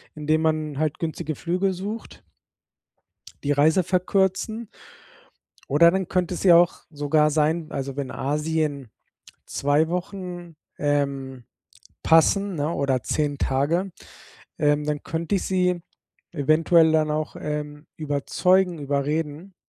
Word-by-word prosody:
indem 155 +1 0
man 155 -2 -1
halt 155 -1 -1
günstige 160 -2 -3
Flüge 185 +4 -1
sucht 205 +5 -7 1.2
die 145 - +2
Reise 155 +5 +3
verkürzen 190 +5 0 1.0
oder 165 +5 +6
dann 190 0 -2
könnte 180 -1 0
es - - -5
ja 175 -3 +7
auch 175 0 +2
sogar 150 0 +2
sein 155 +2 +1
also, 135 -1 -4
wenn 140 -2 -4
Asien 150 -2 -2 0.6
2 145 +3 +1
Wochen, 180 -2 -5 0.2
ähm, 140 -3 -2 0.6
passen, 195 +5 +3
ne, 150 +2 -1
oder 135 -4 0
10 145 +3 -1
Tage, 150 +9 0 0.7
ähm, 145 0 +2
dann 150 -1 -2
könnte 165 +4 -2
ich - - -2
sie 180 -2 +1 0.5
eventuell 160 +2 +4
dann 155 -1 +2
auch, 155 0 -3
ähm, 150 0 -5
überzeugen, 170 +5 +1
überreden 150 +5 -2
155 Hz, 120 wpm, -24 LUFS, 145-175 Hz, 1.2 s, ja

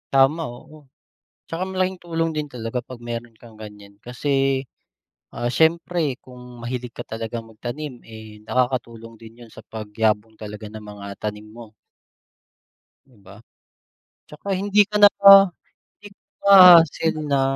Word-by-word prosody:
Tama, 135 +5 +3
oo. 155 +5 -16 0.7
'Tsaka 170 +3 -4
malaking 185 -1 -2
tulong 165 -1 -2
din 150 -1 -4
talaga 115 +1 -4
pag 130 - -8
meron 115 -1 -6
kang 115 -2 -15
gan'yan, 105 -1 -12
kasi, 135 +1 -1 0.7
ah, 120 0 -3
siyempre 160 -3 +1
kung 125 -1 -14 0.2
mahilig 120 0 -6
ka - - -10
talagang 115 0 -6
magtanim, 125 +6 -7
eh, 110 -1 -13
nakakatulong 115 -2 -3
din 115 +1 -15
yun 120 - -13
sa - - -12
pagyabong 110 0 -2
talaga 105 0 -9
ng 110 0 -11
mga 100 -1 -10
tanim 105 0 -6
mo. 110 0 -13 1.3
'Di 130 -4 -25
ba? 95 +1 -14 0.9
'Tsaka 150 +6 -12
hindi 200 +2 +3
ka 210 - -3
na 205 - +9 0.9
hindi 205 - -12 0.3
pa 185 -4 +9
hassle 160 0 -2
na 140 -1 +2
125 Hz, 135 wpm, -22 LUFS, 110-155 Hz, 1.3 s, na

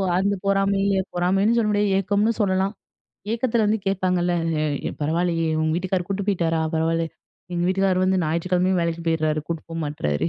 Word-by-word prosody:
அந்த 195 +2 +2
பொறாமைல 195 0 +2
பொறாமைன்னு 195 +5 +2
சொல்ல 220 -2 +2
முடியாது, 205 -1 +1
ஏக்கம்னு 205 +3 +1
சொல்லலா. 190 -2 +2 0.7
ஏக்கத்துல 235 -1 +1
வந்து 215 +1 +2
கேப்பாங்கல்ல, 180 -2 +1 0.5
எ - - -4
பரவாலையே! 165 +2 0
உங்க 155 0 +1
வீட்டுக்கார் 180 0 -1
கூட்டு 200 0 -2
போயிட்டாரா? 170 -5 +1
பரவால, 165 +1 +1 0.5
எங்க 170 - -1
வீட்டுக்கார் 190 0 +2
வந்து 185 0 +2
ஞாயிற்றுக்கிழமயும் 180 +3 +1
வேலைக்கு 170 0 -2
போயிடுறாரு. 155 -2 +1
கூட்டு 165 -2 -3
போ - - -6
மாட்றாரு. 110 - -1
185 Hz, 150 wpm, -23 LUFS, 165-195 Hz, 0.7 s, அந்த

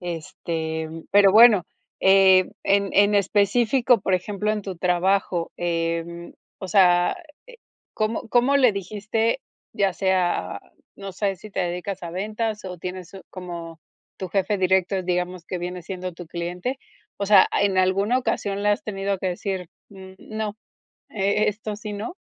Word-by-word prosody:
Este, 160 -2 -4
mm, 160 0 -9
pero 200 -1 +6
bueno, 215 -4 +7 0.4
eh, 190 -1 +5
en 200 -1 +2
en 205 +1 +4
específico, 225 +5 +3
por 190 -1 +1
ejemplo, 205 +3 -2
en 210 -1 -3
tu 190 -3 -6
trabajo, 180 0 0
em, 170 0 -3 0.3
o 190 - -7
sea, 180 - +4 0.3
eh, - - -14 0.4
¿cómo 215 +1 -2
cómo 250 +4 +3
le 250 -6 +5
dijiste? 215 +5 -2 0.3
ya 195 -2 +1
sea, 185 -2 0 0.4
no 195 -1 -8
sé, 195 0 -1
si 215 - -12
te - - -2
dedicas 180 +2 -4
a 170 - -5
ventas 215 +3 -3
o 180 -2 -7
tienes 180 0 -7
un, 195 - -10
como 170 -3 -8 0.4
tu 185 - -6
jefe 195 +2 0
directo. 190 0 +1
Digamos 180 -1 -2
que 180 0 -5
viene 180 +1 -5
siendo 185 +1 -6
tu 175 -1 -10
cliente. 175 +10 -4 0.4
O 200 - -2
sea, 205 - +7
¿en 200 -2 +1
alguna 195 +6 +2
ocasión 200 -5 -2
le 205 - +3
has 205 - 0
tenido 195 -2 -2
que 190 - -3
decir, 180 -1 -4 0.2
mm 190 -1 -12
no, 215 -1 -5 0.5
e 200 +1 +1
esto 210 0 -4
sí, 210 0 -7
no? 215 - -5
190 Hz, 160 wpm, -23 LUFS, 180-210 Hz, 0.5 s, bueno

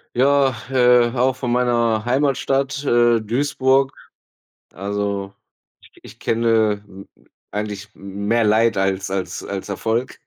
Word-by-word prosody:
Ja, 135 0 +3 0.2
äh, 125 -2 +4
auch 130 +1 +2
von 125 -2 -3
meiner 120 -3 +1
Heimatstadt, 135 +1 0
äh, 120 -3 +3
Duisburg. 135 +3 +1 0.8
Also, 100 0 -3 0.6
i - - -19
ich - - -14
kenne 110 -3 +1
m 95 0 -13 0.4
eigentlich 105 0 -5
mehr 100 +4 -1
Leid 110 +1 +3
als 95 0 -1
als 95 -1 -4
als 100 0 -5
Erfolg. 110 +5 -2
115 Hz, 115 wpm, -20 LUFS, 100-125 Hz, 0.8 s, äh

